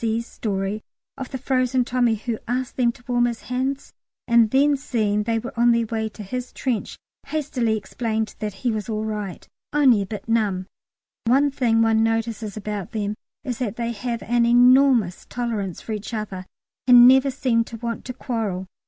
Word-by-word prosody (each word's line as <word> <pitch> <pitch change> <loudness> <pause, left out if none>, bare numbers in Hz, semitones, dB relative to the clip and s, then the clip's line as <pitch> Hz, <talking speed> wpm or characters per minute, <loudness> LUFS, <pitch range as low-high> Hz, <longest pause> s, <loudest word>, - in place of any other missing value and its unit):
C.'s 230 +1 0
story 200 -1 -3 0.3
of 265 - -6
the 265 - -4
frozen 255 -1 +1
Tommy 245 -2 +2
who 220 +1 -4
asked 250 +1 -2
them 240 -2 +2
to 245 - -19
warm 240 -1 +2
his 235 -1 -4
hands, 260 +2 -3 0.3
and 235 -2 +5
then 285 +4 +4
seeing 215 -6 0
they 225 +2 0
were 235 +3 -5
on 240 0 +4
their 230 0 +1
way 220 0 -2
to 210 0 -10
his 250 +5 -5
trench 250 -5 -3 0.3
hastily 260 -7 -1
explained 220 +1 -3
that 215 -1 -3
he 240 - +3
was 215 0 -4
all 215 0 -2
right 210 -4 -5 0.2
only 265 -8 +4
a 195 - -4
bit 210 +2 -7
numb. 210 -5 +1 0.6
One 275 +5 +3
thing 230 -4 +2
one 225 0 +3
notices 225 -2 -1
about 210 -2 -5
them 210 -1 -1 0.3
is 245 -4 -4
that 230 -5 -2
they 235 0 -2
have 235 +1 -4
an 240 +1 +2
enormous 245 -4 +4
tolerance 220 -7 -3
for - - -7
each 215 +2 -4
other 195 -4 -5 0.4
and 245 -1 +9
never 265 +2 +6
seem 255 -3 +1
to 230 - -8
want 235 0 -4
to 250 - -5
quarrel. 225 -8 -3
230 Hz, 185 wpm, -23 LUFS, 215-250 Hz, 0.6 s, and